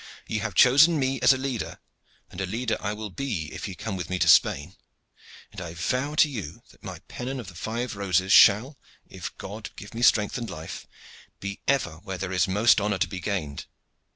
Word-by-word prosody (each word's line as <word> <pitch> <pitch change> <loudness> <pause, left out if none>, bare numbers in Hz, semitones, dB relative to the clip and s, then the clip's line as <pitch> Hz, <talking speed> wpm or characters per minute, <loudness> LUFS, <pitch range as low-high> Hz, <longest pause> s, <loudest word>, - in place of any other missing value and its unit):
Ye 110 - -2
have 105 -3 -4
chosen 150 +6 +6
me 135 -1 0
as - - +7
a 130 - +2
leader, 130 -4 -4 0.5
and - - -6
a 95 - -2
leader 115 +4 -1
I 105 - -2
will 105 -1 -6
be 95 - -4
if - - -5
ye 95 - -7
come 105 0 -5
with 90 -2 -5
me 95 - -1
to - - +1
Spain; 75 +7 +4 0.8
and - - -8
I 85 -1 -7
vow 130 - -1
to 155 - +5
you 105 - -7
that - - -23
my - - -8
pennon 130 +2 -5
of 110 -6 -8
the - - -13
five 110 +7 -4
roses 95 -1 +1
shall, 120 +8 +6 0.3
if - - -8
God - - -7
give - - -11
me 115 - -5
strength 105 -2 +3
and 115 -2 -5
life, 80 -2 -8 0.5
be 100 0 -6
ever 135 - +1
where 95 +3 -7
there 95 0 -4
is 95 +1 +2
most 105 +3 +4
honor 105 -1 0
to 95 - 0
be 90 +1 -6
gained. 85 -7 -4
105 Hz, 210 wpm, -26 LUFS, 95-125 Hz, 0.8 s, as